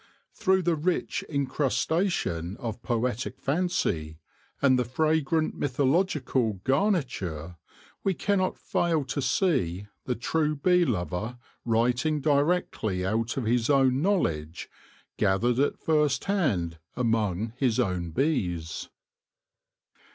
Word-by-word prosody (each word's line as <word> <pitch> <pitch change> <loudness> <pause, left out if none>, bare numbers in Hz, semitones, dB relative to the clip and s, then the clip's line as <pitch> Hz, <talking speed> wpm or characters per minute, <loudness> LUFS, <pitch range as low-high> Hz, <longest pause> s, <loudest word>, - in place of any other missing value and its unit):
Through 190 0 +2
the 170 -1 +2
rich 170 +4 -1
incrustation 140 - 0
of 115 -3 -5
poetic 120 0 -2
fancy, 135 - -1 0.4
and 130 -2 +4
the - - +2
fragrant 155 +4 +1
mythological 135 - +1
garniture, 130 - -1 0.5
we 195 -2 +1
cannot 195 0 0
fail 165 -4 0
to 140 +2 -2
see 130 - +1 0.2
the 125 - -1
true 150 +5 0
bee 180 +4 +3
lover 105 - -2 0.3
writing 120 +6 +1
directly 140 - +1
out 115 +5 -1
of 135 - -1
his 115 +2 +1
own 135 -2 +4
knowledge, 85 - -1 0.5
gathered 115 +6 +2
at 140 - +1
first 150 -3 +1
hand 100 - 0 0.2
among 110 -3 0
his 130 -3 +1
own 90 -7 0
bees. 85 - -1
130 Hz, 105 wpm, -27 LUFS, 110-155 Hz, 0.5 s, and